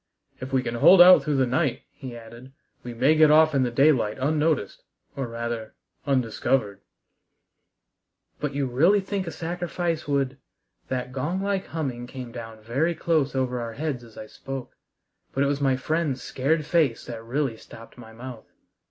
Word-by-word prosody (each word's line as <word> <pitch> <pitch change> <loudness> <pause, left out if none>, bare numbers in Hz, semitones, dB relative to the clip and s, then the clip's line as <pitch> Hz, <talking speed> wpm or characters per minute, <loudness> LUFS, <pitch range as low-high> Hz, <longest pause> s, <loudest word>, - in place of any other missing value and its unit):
"If 130 +1 -7
we 130 -1 +1
can 115 - -3
hold 175 +10 +6
out 180 +1 +9
through 150 -2 -1
the 135 -1 +3
night," 130 +1 0
he 125 -3 -9
added, 120 +3 -13 0.3
"we 125 - -6
may 130 +6 +3
get 155 -1 +5
off 155 +1 +5
in 135 - +2
the 125 - +1
daylight 130 -4 +3
unnoticed, 150 -4 0 0.3
or 135 -2 -3
rather, 115 -1 -5 0.3
undiscovered." 115 -5 0 1.6
"But 145 -2 -3
you 140 -1 0
really 160 +11 +3
think 195 -1 -3
a - - -3
sacrifice 175 -1 -3
would 140 -1 -1 0.2
" - - -47
That 125 -1 -3
gong 150 +8 -2
like 195 -1 -1
humming 130 -7 -4
came 125 -1 -8
down 115 -2 -9
very 140 +10 0
close 155 -5 0
over 125 -1 -1
our 115 -1 -5
heads 140 -2 -3
as 115 -2 -16
I 110 - -7
spoke, 135 +3 -8 0.6
but 135 - +2
it - - +2
was 145 0 -1
my 135 -2 +3
friend's 145 0 -2
scared 150 +4 0
face 155 -8 +1
that 115 -2 -7
really 130 +1 -1
stopped 115 +1 -14
my 115 -2 -13
mouth. 120 0 -10
135 Hz, 175 wpm, -25 LUFS, 120-155 Hz, 1.6 s, out